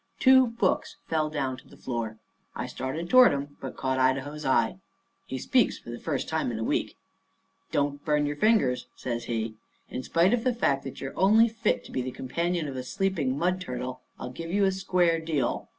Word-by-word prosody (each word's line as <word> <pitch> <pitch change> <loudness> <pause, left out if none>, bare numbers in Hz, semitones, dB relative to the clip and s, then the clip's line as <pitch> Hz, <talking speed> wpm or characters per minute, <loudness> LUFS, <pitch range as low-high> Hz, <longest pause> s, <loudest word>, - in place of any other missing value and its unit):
Two 260 -1 +7
books 230 -5 0
fell 155 -1 0
down 135 -4 -2
to - - -16
the - - -16
floor. 115 -3 -4 0.4
I - - -3
started 155 +6 -4
toward 255 0 +7
'em, 145 0 -5
but 135 - -6
caught 130 0 0
Idaho's 135 +3 0
eye. 125 +5 +2 0.5
He 130 - -4
speaks 250 - +2
for 120 - -10
the 120 - -6
first 145 -5 -2
time 160 -5 -1
in 115 - -4
a 110 - -2
week. - - -1 0.7
"Don't 145 0 0
burn 150 -2 +2
your 145 0 -2
fingers," 175 - +2
says 120 -1 -4
he. 115 -1 -2 0.4
"In 125 - -4
spite 170 - +3
of 235 -2 +1
the 250 -2 +1
fact 140 -12 +1
that 135 - -7
you're 135 - -5
only 215 +5 +5
fit 225 -1 0
to - - -11
be 130 - -1
the 125 - -3
companion 170 +6 -2
of 135 - -5
a 130 - -3
sleeping 160 -4 -1
mud 180 +3 0
turtle, 125 -4 -5 0.2
I'll 125 - -5
give 165 +5 -7
you 200 +3 +2
a 190 - +3
square 180 -3 +2
deal. 155 -6 -1
145 Hz, 205 wpm, -27 LUFS, 130-185 Hz, 0.7 s, Two